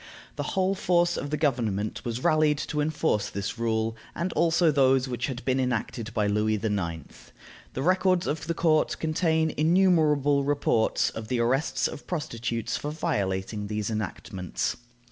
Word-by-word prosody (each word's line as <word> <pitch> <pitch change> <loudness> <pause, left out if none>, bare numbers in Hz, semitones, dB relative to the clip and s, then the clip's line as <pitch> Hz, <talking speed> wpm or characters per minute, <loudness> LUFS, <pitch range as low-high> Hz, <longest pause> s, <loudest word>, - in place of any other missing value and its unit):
The - - -3 0.2
whole 190 +1 +3
force 175 -2 +2
of 145 - -4
the 150 - -1
government 115 -8 -1
was 120 0 -4
rallied 155 -1 +3
to 150 - 0
enforce 150 -8 0
this 100 +4 -4
rule, 110 -1 0 0.2
and 170 +2 -2
also 165 0 +3
those 135 -2 +3
which 125 -1 -2
had 130 -3 -6
been 130 0 +1
enacted 120 -2 -2
by 110 -2 0
Louis 105 +1 +1
IX. 100 -6 -2 0.7
The 130 - -3
records 185 +1 +2
of 155 +1 -3
the 170 - -1
court 155 -2 +2
contain 160 0 +1
innumerable 155 -4 +3
reports 140 -5 +1
of 110 -1 -7
the 125 +1 -1
arrests 135 +3 +1
of - - -9
prostitutes 115 - -3
for 145 - -4
violating 105 - -2
these 105 +1 -2
enactments. 95 -3 -3
135 Hz, 155 wpm, -27 LUFS, 110-160 Hz, 0.7 s, whole